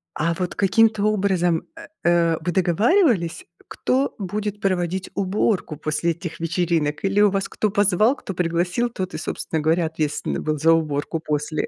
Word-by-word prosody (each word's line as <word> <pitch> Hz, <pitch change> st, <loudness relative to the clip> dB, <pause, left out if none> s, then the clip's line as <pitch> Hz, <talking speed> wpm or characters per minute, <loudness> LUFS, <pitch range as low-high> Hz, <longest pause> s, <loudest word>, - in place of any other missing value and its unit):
а 165 Hz, +2 st, 0 dB
вот 180 Hz, 0 st, -4 dB
каким-то 210 Hz, +2 st, +3 dB
образом, 190 Hz, -5 st, +1 dB
э, 330 Hz, -, -10 dB, 0.2 s
э, 170 Hz, -1 st, +3 dB
вы 175 Hz, +2 st, -1 dB
договаривались 195 Hz, -, +2 dB, 0.2 s
кто 265 Hz, +2 st, 0 dB
будет 205 Hz, +1 st, -4 dB
проводить 185 Hz, -1 st, -1 dB
уборку 195 Hz, -3 st, 0 dB
после 155 Hz, +3 st, -1 dB
этих 170 Hz, 0 st, -7 dB
вечеринок 165 Hz, -2 st, -1 dB
или 195 Hz, +1 st, +1 dB
у 210 Hz, -1 st, +6 dB
вас 195 Hz, 0 st, -2 dB
кто 215 Hz, -, -1 dB
позвал, 205 Hz, +5 st, +3 dB
кто 195 Hz, -, -7 dB
пригласил, 175 Hz, +7 st, 0 dB
тот 185 Hz, -5 st, -5 dB
и, -, -, -3 dB
собственно 160 Hz, -, -3 dB
говоря, 165 Hz, +2 st, +2 dB
ответственный 155 Hz, -2 st, -2 dB
был 155 Hz, -1 st, -1 dB
за 165 Hz, +3 st, +4 dB
уборку 160 Hz, 0 st, 0 dB
после? 150 Hz, 0 st, -2 dB
180 Hz, 160 wpm, -22 LUFS, 165-205 Hz, 0.2 s, у